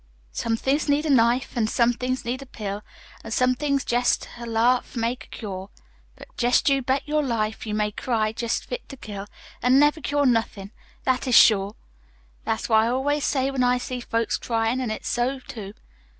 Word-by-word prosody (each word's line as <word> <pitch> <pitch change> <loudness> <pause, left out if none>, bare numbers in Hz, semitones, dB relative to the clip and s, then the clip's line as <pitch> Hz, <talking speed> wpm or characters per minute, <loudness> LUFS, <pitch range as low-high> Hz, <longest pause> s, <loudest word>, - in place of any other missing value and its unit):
Some 225 - -1
things 285 +5 0
need 290 +2 +2
a 305 - +1
knife, 245 +1 +3
An' 225 -3 +1
some 235 +2 +2
things 255 +1 -3
need 250 +3 -2
a 275 - -10
pill, 205 -4 -5 0.4
An' - - -8
some 255 +3 +2
things 280 +1 -1
jest 245 +1 +1
a 235 - -6
laugh'll 235 +2 +1
make 235 +2 -2
a - - -23
cure. 195 -3 -7 0.5
But - - -15
jest 245 +1 +3
you 275 -1 +2
bet 265 +3 -1
your 300 0 +1
life, 225 -5 -2
You 210 - -2
may 210 0 0
cry 215 -1 -1
jest 235 0 -2
fit - - -6
to 275 - -9
kill, 205 -4 -7 0.3
An' 250 +2 +4
never 295 +2 +4
cure 285 0 +1
nothin' 225 -5 0 0.3
that 260 0 0
is 250 - +3
sure. 205 -1 +6 0.7
That's 220 - -1
what 220 -2 +5
I 225 - +1
always 275 +4 0
say 270 -1 +1
when 265 -2 0
I 250 0 +3
see 250 0 -4
folks 230 -1 -1
cryin'. 230 +2 0
An' 250 - -2
it's 215 - -4
so, 250 +3 0
too. 215 -5 -9
245 Hz, 200 wpm, -24 LUFS, 225-265 Hz, 0.7 s, sure